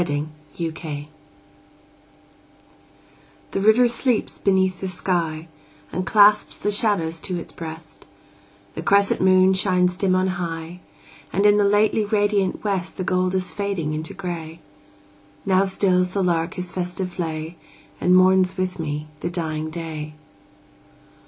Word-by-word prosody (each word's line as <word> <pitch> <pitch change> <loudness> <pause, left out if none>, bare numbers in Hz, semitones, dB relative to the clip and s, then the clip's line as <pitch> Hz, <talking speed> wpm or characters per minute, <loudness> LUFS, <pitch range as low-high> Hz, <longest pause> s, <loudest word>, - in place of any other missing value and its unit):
Y 175 - 0
Z 145 0 -1 0.3
Sunset 160 -3 -4 2.5
THE 195 - -1
river 220 +4 +5
sleeps 240 0 -1
beneath 190 -1 +1
the 190 - -2
sky, 170 -3 -2 0.4
And 185 +1 -3
clasps 210 -1 +5
the 210 - -1
shadows 200 -6 0
to 180 +1 -4
its 170 - -8
breast; 160 -1 -9 0.7
The - - -5
crescent 200 0 +3
moon 185 0 +5
shines 180 -1 +1
dim 185 0 +1
on 185 0 +2 0.2
high; 165 +1 -5 0.5
And 200 +2 +1
in 205 0 +6
the 205 - +4
lately 205 +2 +3
radiant 205 -2 0
west 195 -4 -2
The 185 - -2
gold 185 0 0
is 185 -1 -1
fading 195 -7 -2
into 155 +1 -5
gray. 170 -4 -6 0.9
Now 190 0 +3
stills 185 -1 +1
the 195 - +1
lark 170 -2 0
his 180 -1 -5
festive 180 0 -4
lay, 160 0 -4 0.4
And 180 +1 +4
mourns 185 0 +4
with 185 -1 -2
me 150 -1 -3
the 170 - -3
dying 155 -3 -3
day. 155 -2 -6
185 Hz, 140 wpm, -22 LUFS, 165-195 Hz, 2.5 s, in